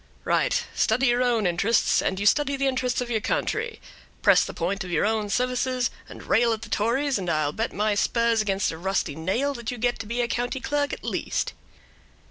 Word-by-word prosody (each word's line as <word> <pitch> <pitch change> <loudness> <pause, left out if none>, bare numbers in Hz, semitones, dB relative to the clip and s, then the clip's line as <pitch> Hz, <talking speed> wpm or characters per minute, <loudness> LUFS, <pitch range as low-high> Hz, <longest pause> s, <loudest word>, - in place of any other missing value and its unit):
"Right; 485 - +1
study 245 +4 +2
your 240 +1 +2
own 240 -4 +2
interests, 185 +6 +2
and 190 - -1
you 205 - -2
study 280 +5 +3
the 275 - 0
interests 255 -2 0
of 245 -1 -4
your 220 -2 0
country; 445 - -2 0.4
press - - +6
the - - -5
point 190 +4 -2
of 180 - -8
your 170 +2 +1
own 215 -1 0
services, 250 +2 0 0.2
and - - -10
rail 230 0 +3
at 220 0 -5
the 225 - -9
Tories, 235 +5 +1
and 180 -2 -3
I'll 155 -2 +1
bet 225 +8 -2
my 210 +1 0
spurs 230 +2 +2
against 195 -2 0
a 160 - -8
rusty 190 -5 -1
nail 210 - -1
that 235 -3 -6
you 245 - -4
get 240 +1 0
to 215 - -6
be 235 +2 -1
a 240 - 0
county 245 +2 -2
clerk 290 +2 -1
at - - -6
least." - - -2
230 Hz, 215 wpm, -25 LUFS, 200-250 Hz, 0.4 s, press